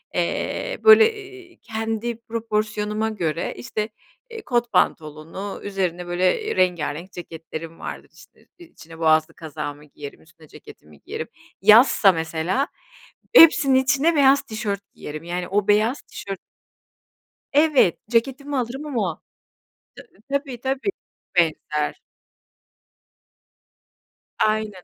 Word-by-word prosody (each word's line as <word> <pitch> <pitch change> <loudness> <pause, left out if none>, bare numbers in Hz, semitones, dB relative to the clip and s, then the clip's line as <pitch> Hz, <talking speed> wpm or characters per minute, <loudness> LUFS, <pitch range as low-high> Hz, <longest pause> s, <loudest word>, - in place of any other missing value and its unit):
Eee, - - -2
böyle, 440 +1 +8
eee, 385 -4 -13
kendi 225 0 -3
proporsiyonuma 215 -1 -2
göre, 170 -7 -2
işte, 220 -3 -4 0.4
eee, 455 -1 -8
kot 240 - -1
pantolonu, 160 +6 -1
üzerine, 180 -3 -3
böyle, 185 - 0
rengarenk 175 -1 0
ceketlerim 165 -1 -8
vardır. - - -7
İşte, - - -20
içine 165 - -14
boğazlı 155 -1 +3
kazağımı 150 -2 -7
giyerim, 145 -1 -11
üstüne 160 -1 -20
ceketimi 75 - -16
giyerim. - - -6 0.3
Yazsa 215 0 +7
mesela 165 - -1 0.7
hepsinin 300 - +8
içine 270 +5 +3
beyaz 275 -1 +5
tişört 215 -5 -4
giyerim, 155 +2 -8
yani, 175 +1 -4
o 200 +1 0
beyaz 215 +6 +2
tişört 195 -1 -8 1.1
Evet 290 - +4
ceketimi 270 +4 0
alırım 255 +4 -3
ama 215 - -2 1.1
Ta 280 - +3
tabii, 270 -4 -10
tabii, 270 +8 -1 0.5
benzer. 155 -3 0 2.4
Aynen 215 -3 0
210 Hz, 105 wpm, -22 LUFS, 165-265 Hz, 2.4 s, böyle